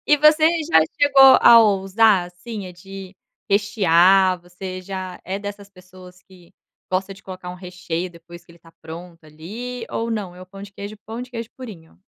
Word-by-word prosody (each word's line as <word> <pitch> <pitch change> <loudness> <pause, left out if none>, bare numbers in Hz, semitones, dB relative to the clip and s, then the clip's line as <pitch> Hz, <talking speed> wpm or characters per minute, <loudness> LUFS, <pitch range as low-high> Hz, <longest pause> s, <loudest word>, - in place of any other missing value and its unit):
E 295 - +5
você 305 +2 +5 0.2
já 160 - +6 0.2
chegou 270 -2 +7
a 235 - +8
ousar, 200 -1 +3
assim, 185 +2 -9
de 195 +1 -11 0.4
rechear. 190 -2 +3
Você 185 +1 -8
já 185 -1 -7
é 190 +2 -4
dessas 205 0 -8
pessoas 185 -1 -16
que 180 -2 -20 0.4
gosta 190 +1 -2
de 195 - -18
colocar 185 -1 -9
um 180 - -8
recheio 180 -1 -6
depois 170 0 -15
que - - -19
ele 170 - -20
tá 165 0 -20
pronto, 165 0 -11
ali, 225 +11 -8
ou 230 +1 -3
não? 200 -5 -4
É 180 - -14
o 185 - -11
pão 195 +1 -12
de 200 0 -11
queijo, 205 +2 -9
pão 225 +2 -7
de 250 - -11
queijo 230 -2 -6
purinho? 200 -13 -12
190 Hz, 185 wpm, -21 LUFS, 180-215 Hz, 0.4 s, a